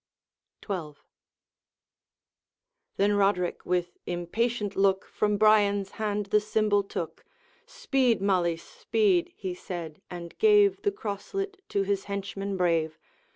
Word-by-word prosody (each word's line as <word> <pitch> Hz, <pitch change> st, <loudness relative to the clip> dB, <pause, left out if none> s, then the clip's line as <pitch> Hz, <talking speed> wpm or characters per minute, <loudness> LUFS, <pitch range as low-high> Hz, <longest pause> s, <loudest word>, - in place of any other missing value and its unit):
XII. 175 Hz, -7 st, -3 dB, 2.0 s
Then 205 Hz, +1 st, +3 dB
Roderick 195 Hz, -3 st, +1 dB
with 175 Hz, -1 st, -1 dB
impatient 205 Hz, +4 st, -1 dB
look 195 Hz, -1 st, +2 dB
From 210 Hz, -1 st, 0 dB
Brian's 205 Hz, -2 st, +4 dB
hand 210 Hz, -2 st, -2 dB
the 210 Hz, -, +5 dB
symbol 210 Hz, -1 st, +1 dB
took: 200 Hz, -, -6 dB, 0.4 s
'Speed, 275 Hz, -, +1 dB
Malise, 175 Hz, -4 st, +1 dB
speed' 370 Hz, -5 st, +1 dB
he 190 Hz, -3 st, -4 dB
said, 175 Hz, -3 st, -7 dB
and 170 Hz, -1 st, -8 dB
gave 410 Hz, -2 st, +5 dB
The 410 Hz, -, +1 dB
crosslet 390 Hz, -, -4 dB
to 200 Hz, -, +1 dB
his 195 Hz, 0 st, -1 dB
henchman 200 Hz, 0 st, -4 dB
brave. 165 Hz, -3 st, +1 dB
200 Hz, 110 wpm, -27 LUFS, 180-225 Hz, 2.0 s, the